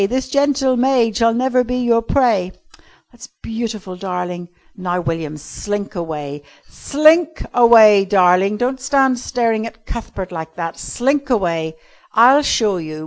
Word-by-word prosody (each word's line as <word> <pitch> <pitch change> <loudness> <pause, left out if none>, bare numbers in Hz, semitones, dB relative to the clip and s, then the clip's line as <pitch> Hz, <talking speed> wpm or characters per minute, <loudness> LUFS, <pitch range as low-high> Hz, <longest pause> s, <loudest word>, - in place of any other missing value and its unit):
This 260 +1 -2
gentle 280 -2 +1
maid 245 -3 +1
shall 230 -1 +3
never 250 +1 +1
be 250 +1 -3
your 240 -2 +2
prey." 225 -7 0 0.6
"That's 245 +2 -14
beautiful, 220 -5 -5
darling. 180 -1 -5 0.3
Now, 180 -2 -3
William, 165 -3 -4
slink 205 +7 -6
away. 150 -5 -6 0.3
Slink 315 +2 +2
away, 220 -4 +6
darling. 190 +1 +2
Don't 255 +3 -2
stand 265 -2 +1
staring 230 -3 -1
at 225 -1 -14
Cuthbert 195 -5 -7
like 160 -2 -7
that. 165 -1 -6
Slink 275 +3 -2
away. 165 -8 -1 0.4
I'll 255 +6 +6
show 215 -8 0
you. 155 -2 -7
225 Hz, 140 wpm, -18 LUFS, 180-255 Hz, 0.6 s, away